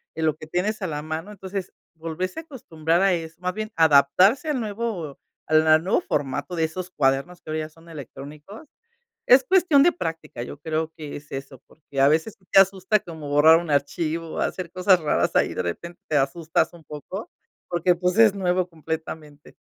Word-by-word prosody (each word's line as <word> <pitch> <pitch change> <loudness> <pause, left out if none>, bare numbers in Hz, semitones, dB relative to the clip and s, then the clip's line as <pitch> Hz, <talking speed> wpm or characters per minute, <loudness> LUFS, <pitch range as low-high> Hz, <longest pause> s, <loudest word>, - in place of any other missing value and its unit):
en 160 - -1
lo 155 - +2
que 155 0 -11
tienes 205 +7 -1
a 190 - -1
la 150 -2 -4
mano. 160 +5 -5
Entonces, 190 -1 -6 0.2
volverse 165 - -4
a - - -7
acostumbrar 170 - -2
a 195 -1 +4
eso, 165 -1 -4
más 180 0 -2
bien, 215 +2 -5
adaptarse 165 - +4
al 290 -4 0
nuevo 210 - -4 0.3
a 155 - -3
la 155 0 +6
nuevo 190 - +1
formato 145 - -3
de 165 - 0
esos 175 +3 -3
cuadernos 140 +4 0
que 155 - -8
hoy 155 - -1
ya 155 0 -4
son 165 +2 -19
electrónicos, 150 - -10 0.6
es 260 +2 +7
cuestión 335 -2 +4
de 350 - +5
práctica, 160 - -5
yo 135 - -8
creo 160 +1 -2
que 150 -2 -7
es 145 0 -15
eso, 135 -1 -7
porque, 140 -3 -5
a 135 - +6
veces, 160 +9 +1
te - - +7
asusta 195 +2 +3
como 160 -6 -9
borrar 150 +3 +6
un 170 -1 -7
archivo, 160 +3 -1
o - - -3
hacer 180 -3 -3
cosas 185 0 +4
raras 150 - 0
ahí, - - +2
de - - -2
repente 170 - -6
te 150 - +1
asustas 155 +6 0
un 170 -2 -15
poco, 155 +8 -8 0.4
porque, 175 +1 +2
pues, 180 +2 -1
es 225 -3 +6
nuevo 180 -2 0
completamente. 160 -2 -7
165 Hz, 195 wpm, -24 LUFS, 155-190 Hz, 0.6 s, es